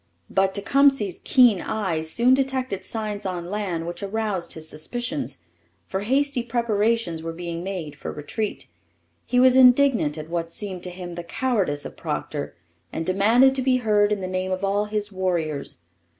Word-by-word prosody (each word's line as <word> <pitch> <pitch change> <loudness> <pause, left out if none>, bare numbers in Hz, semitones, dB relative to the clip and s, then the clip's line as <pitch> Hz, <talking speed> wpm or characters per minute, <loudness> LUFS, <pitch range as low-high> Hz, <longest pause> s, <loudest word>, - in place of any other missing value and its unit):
But 190 0 +2
Tecumseh's 225 -2 +2
keen 245 -8 +5
eyes 170 -8 -2
soon 240 +8 +4
detected 260 -7 0
signs 210 0 -4
on 180 -2 -4
land 190 -6 -2
which 175 +3 -6
aroused 205 -2 -2
his 160 -1 -7
suspicions, 240 - -3 0.4
for 190 - -3
hasty 270 +5 +1
preparations 230 -6 0
were 165 0 -4
being 170 0 -5
made 180 -6 -5
for - - -6
retreat. 200 +9 -4 0.6
He 250 - +2
was 255 0 +6
indignant 250 - +5
at 155 0 -6
what 165 0 -3
seemed 185 0 -6
to - - -4
him 180 -1 -7
the 175 0 -6
cowardice 190 - -1
of - - -8
Procter, 70 0 -4 0.4
and 160 - -3
demanded 225 +9 +4
to 265 - -1
be 255 0 +3
heard 210 -3 +2
in 205 -2 0
the 185 - -3
name 185 0 -2
of 185 +1 -2
all 200 +1 +1
his 210 0 -3
warriors. 170 - -2
200 Hz, 165 wpm, -24 LUFS, 175-235 Hz, 0.6 s, was